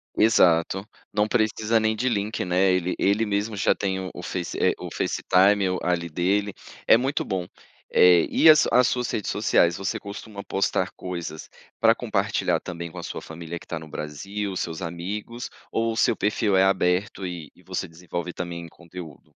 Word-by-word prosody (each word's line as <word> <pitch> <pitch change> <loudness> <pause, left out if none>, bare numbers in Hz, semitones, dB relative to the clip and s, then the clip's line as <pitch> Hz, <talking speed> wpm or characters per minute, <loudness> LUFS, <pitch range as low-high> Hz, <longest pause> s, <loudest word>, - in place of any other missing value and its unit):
Exato, 95 -2 +3 0.2
não 105 +1 +1
precisa 110 0 +1
nem 110 0 +1
de 125 +4 -1
link, 105 -4 -1
né, 90 +1 +3
ele 90 0 0
ele 100 +3 +2
mesmo 105 +1 -1
já 100 - +3
tem 95 -1 -3
o 90 - -8
face 90 -1 -4 0.2
o - - -7
facetime 100 +2 +3 0.2
ali 85 -1 0
dele, 95 +5 0 0.3
é - - +8
muito 135 +4 -1
bom. 90 -2 -3 0.4
E 90 - +5
as 155 - +7
as 125 +1 +5
suas 125 -2 -1
redes 105 - -2
sociais, 85 -5 +3
você 95 0 -2
costuma 100 0 -8
postar 95 -1 0
coisas 85 -4 -6 0.3
para - - +5
compartilhar - - 0
também 85 -2 -7
com 90 - -8
a - - -7
sua - - -6
família 85 +1 -7
que - - -16
tá 85 - -4
no 80 - -11
Brasil, 95 +8 -5
seus 85 0 -4
amigos, 100 +8 -5 0.2
ou 115 0 0
o - - -7
seu - - +3
perfil 105 -1 +1
é 95 - +5
aberto 95 +1 +1
e 85 -5 -6
e - - -22
você - - -4
desenvolve 85 +1 -6
também 85 -1 -5
conteúdo? 85 -2 -11
95 Hz, 175 wpm, -25 LUFS, 85-105 Hz, 0.4 s, é